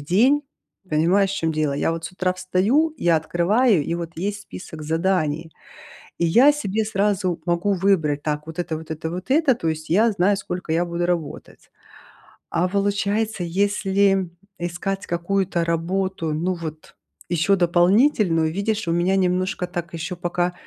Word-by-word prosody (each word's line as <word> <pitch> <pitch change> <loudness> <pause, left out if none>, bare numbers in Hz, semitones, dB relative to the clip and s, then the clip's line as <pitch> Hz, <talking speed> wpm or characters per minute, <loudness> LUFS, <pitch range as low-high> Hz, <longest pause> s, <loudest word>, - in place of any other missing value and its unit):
день. 230 - +3 0.5
Понимаешь, 180 +6 +2
в - - -3
чём 165 -3 0
дело? 155 -2 0
Я 140 - 0
вот 165 0 -5
с - - -6
утра 185 0 0
встаю, 195 - +1
я 170 -1 +3
открываю 175 - +2
и 165 - -2
вот 170 -1 -6
есть 205 +4 -3
список 160 -6 -9
заданий. 160 -1 0 0.7
И - - +1
я 240 - +6
себе 220 -7 -2
сразу 195 -4 0
могу 175 +4 +1
выбрать: 170 -6 +1
так 150 0 -3
вот 160 +1 -9
это, 170 -2 -2
вот 160 - -12
это, 160 +1 -4
вот 180 +5 -7
это. 285 -1 +4
То 170 -8 -3
есть 155 0 -4
я 215 +7 +4
знаю 200 0 +2
сколько 180 -4 -4
я 170 +2 +2
буду 170 0 -2
работать. 170 -5 -4 0.8
А 180 +2 +1
получается, 200 +1 0
если 195 +1 +1 0.3
искать 175 +3 -3
какую-то 175 0 -1
работу 170 0 -1
ну 175 +5 -1
вот 160 -2 -8 0.3
ещё 175 +3 +2
дополнительную, 175 - +3
видишь 200 0 -1
у - - +1
меня 175 +3 +2
немножко 185 0 0
так 175 -1 -5
ещё 165 +2 -4
пока, 175 0 -1
180 Hz, 160 wpm, -22 LUFS, 165-200 Hz, 0.8 s, я